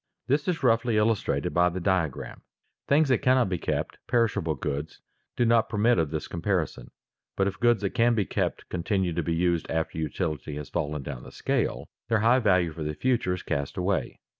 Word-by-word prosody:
This 140 +4 +1
is 175 -5 -1
roughly 115 -2 +3
illustrated 105 -7 +1
by 90 +2 +4
the 90 +1 -4
diagram. 85 -6 -1 0.5
Things 145 +1 +4
that 130 - +3
cannot 130 -4 +3
be 90 -2 -2
kept, - - -3
perishable 115 -10 +1
goods, 75 +2 -4 0.4
do 120 - +2
not 115 -1 +3
permit 110 -1 +3
of 80 -3 +1
this 80 -1 -4
comparison. 85 -2 -2 0.5
But 95 - +2
if 95 - -4
goods 120 -3 +3
that 100 - 0
can 120 -1 +3
be 105 -3 +1
kept - - -2
continue 90 0 -1
to 85 - -1
be 85 +1 -1
used 85 -1 0
after 80 0 -2
utility 75 -2 -3
has 75 -1 -6
fallen 75 -3 -2
down 65 -3 -6
the - - -12
scale, - - -1 0.2
their 115 -2 +2
high 120 +4 +5
value 90 -7 +3
for 80 - -9
the 75 0 -3
future 120 -6 +1
is 90 - -9
cast 70 +1 -3
away. 95 +1 -1
95 Hz, 195 wpm, -27 LUFS, 80-115 Hz, 0.5 s, high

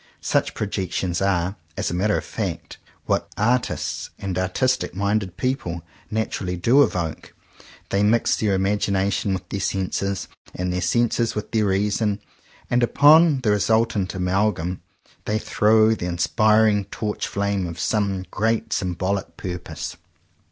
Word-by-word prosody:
Such - - 0
projections 95 -3 -2
are, 95 0 0 0.2
as - - -1
a - - -3
matter 100 +4 +1
of - - -4
fact, 85 -6 -5 0.3
what - - 0
artists 120 +5 0
and 95 -2 -4
artistic 95 +6 0
minded 100 -2 -1
people 90 -11 -2 0.3
naturally 105 -4 -2
do 120 +11 +4
evoke. 85 - -1 0.5
They 100 - +1
mix 110 +3 +3
their 105 -3 +1
imagination 100 0 0
with 95 -2 -3
their 100 - -3
senses, 95 0 -2 0.3
and 90 0 -2
their 90 - -1
senses 120 0 +1
with 105 - -4
their 110 -2 +2
reason; 100 +1 +1 0.5
and 125 0 +2
upon 145 +3 +6
the 110 - +2
resultant 105 -2 +1
amalgam 90 -1 0 0.4
they 105 - 0
throw 110 +1 +3
the 90 -5 -4
inspiring 105 +5 +3
torch 105 +2 -3
flame 100 -2 -1
of 85 -1 -7
some 100 -2 0
great 110 +2 0
sym 90 -3 -1
bolic 95 +2 -2
purpose. 85 -1 -6
100 Hz, 135 wpm, -23 LUFS, 90-110 Hz, 0.5 s, upon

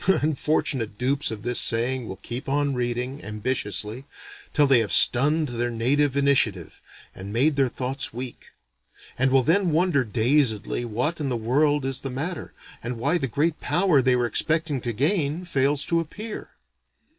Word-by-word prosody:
Unfortunate 150 - 0
dupes 135 +4 0
of 105 -2 -7
this 120 0 +1
saying 120 +1 0
will 95 - -6
keep 120 +7 -7
on 145 0 0
reading, 125 +3 -3
ambitiously, 105 +1 -3 0.5
till 150 - +3
they 135 -3 +5
have 110 -3 -2
stunned 150 +4 +5
their 120 0 -2
native 135 +5 0
initiative, 130 - +1 0.3
and 95 +2 -9
made 135 +7 +2
their 135 -2 +2
thoughts 130 +2 -2
weak; 125 +1 -8 0.7
and 135 +1 +3
will 130 0 +3
then 180 +6 +2
wonder 160 -3 +2
dazedly 120 0 0
what 125 +9 -2
in 140 - -2
the 125 - -1
world 145 +5 +1
is 135 -1 -2
the 135 - -5
matter, 160 +7 -5 0.3
and 120 +1 -5
why 145 +9 0
the 135 - -2
great 155 +7 -1
power 175 -6 +2
they 130 0 +2
were 120 -1 +1
expecting 155 +3 0
to 120 - -3
gain 150 - -1
fails 140 -3 +1
to 170 - +1
appear. 210 +7 -7
135 Hz, 165 wpm, -24 LUFS, 120-150 Hz, 0.7 s, they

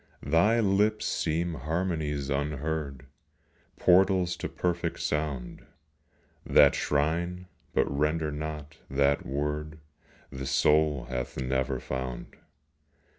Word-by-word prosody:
Thy 85 +10 +4
lips 105 +1 +2
seem 85 +2 -1
harmonies 75 -2 -2
unheard, 70 -1 -2 0.7
Portals 95 -1 +4
to - - -4
perfect 85 -1 -2
sound, 75 -5 -3 0.8
That - - +6
shrine, 85 +5 -1 0.3
but - - +4
render 75 +2 0
not, 75 0 -6
that 70 +1 +1
word 75 +2 -3 0.5
The 65 0 -5
soul 75 0 +3
hath 65 0 -5
never 65 0 -1
found. 65 -2 -5
75 Hz, 95 wpm, -28 LUFS, 70-85 Hz, 0.8 s, That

